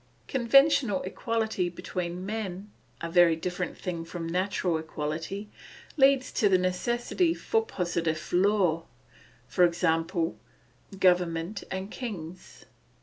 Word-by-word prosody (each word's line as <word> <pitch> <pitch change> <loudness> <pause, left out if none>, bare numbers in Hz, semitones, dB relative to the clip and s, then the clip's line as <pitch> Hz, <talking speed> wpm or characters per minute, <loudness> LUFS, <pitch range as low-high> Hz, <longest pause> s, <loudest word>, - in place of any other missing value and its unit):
Conventional 270 -3 +4
equality 220 -2 -1
between 180 0 -5
men, 205 -2 -5 0.3
a 170 - -4
very 175 -2 +6
different 180 +2 -4
thing 170 -3 -4
from 165 0 -6
natural 180 -1 0
equality, 160 +6 -4 0.5
leads 270 -2 +4
to 205 - +2
the 185 - +5
necessity 240 - 0
for 450 0 0
positive 170 - -2
law, 180 -3 +3 0.7
i.e., 170 +2 -1
government 180 0 +1
and 190 +2 -4
kings. 185 -8 -7
185 Hz, 100 wpm, -28 LUFS, 170-215 Hz, 0.7 s, very